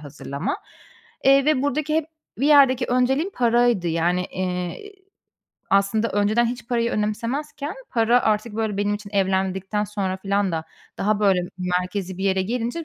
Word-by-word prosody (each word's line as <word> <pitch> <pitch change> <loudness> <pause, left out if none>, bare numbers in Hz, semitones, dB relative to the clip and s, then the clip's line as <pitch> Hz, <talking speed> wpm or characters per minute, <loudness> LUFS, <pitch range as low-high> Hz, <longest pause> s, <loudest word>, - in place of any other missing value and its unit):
hazırlama. 145 - -5 0.7
Eee, 275 0 +6
ve 290 -3 +2
buradaki 300 +2 -1
hep 320 -1 0 0.3
bir 275 - +1
yerdeki 270 -4 +5
önceliğim 265 +8 +1
paraydı, 240 -6 +2
yani, 175 +2 +1
eee, 180 - -4 0.8
aslında 200 +3 +2
önceden 210 +4 +2
hiç 240 0 -5
parayı 235 -1 +1
önemsemezken 275 - -3 0.2
para 235 +1 +3
artık, 215 +1 0
böyle, 220 -3 -1
benim 205 0 +1
için 205 -1 -8
evlendikten 190 +1 0
sonra 195 -2 -3
filan 200 -1 0
da 160 -1 -2 0.3
daha 210 +1 +1
böyle 195 -3 +3 0.2
merkezî 180 +1 -2
bir 195 - -3
yere 190 -1 +2
gelince 240 - -3
210 Hz, 145 wpm, -23 LUFS, 190-245 Hz, 0.8 s, Eee